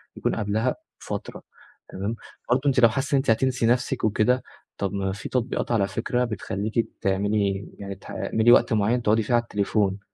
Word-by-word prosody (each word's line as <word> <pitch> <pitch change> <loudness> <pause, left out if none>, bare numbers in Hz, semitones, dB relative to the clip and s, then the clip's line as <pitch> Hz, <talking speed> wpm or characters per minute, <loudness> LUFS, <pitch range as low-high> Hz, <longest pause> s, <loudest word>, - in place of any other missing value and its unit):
يكون - - -1
قبلها 110 +4 0 0.2
فترة، 100 -1 -6 0.5
تمام؟ 100 +4 -3 0.3
برضه 125 +2 +3
أنتِ 135 -3 +3
لو 115 -2 +7
حاسّة 135 +6 -1
إن - - +5
أنتِ 135 -1 0
هتنسي 125 +2 +2
نفسِك 125 +2 +1
وكده، 110 +4 +2 0.3
طب 100 -1 -2
ما 95 -1 -1
في 95 0 -6
تطبيقات 125 -1 -1
على 105 -4 +2
فكرة 120 +5 -1
بتخلّيكِ 110 0 -2
تعملي 100 0 0
يعني 100 -1 -6
تح - - -16
تعملي 110 +2 +2
وقت 120 - +5
معيّن 110 +3 +2
تقعدي 110 0 +2
فيه 115 - -2
على 120 0 +4
التليفون، 100 -2 0
110 Hz, 180 wpm, -25 LUFS, 100-120 Hz, 0.5 s, لو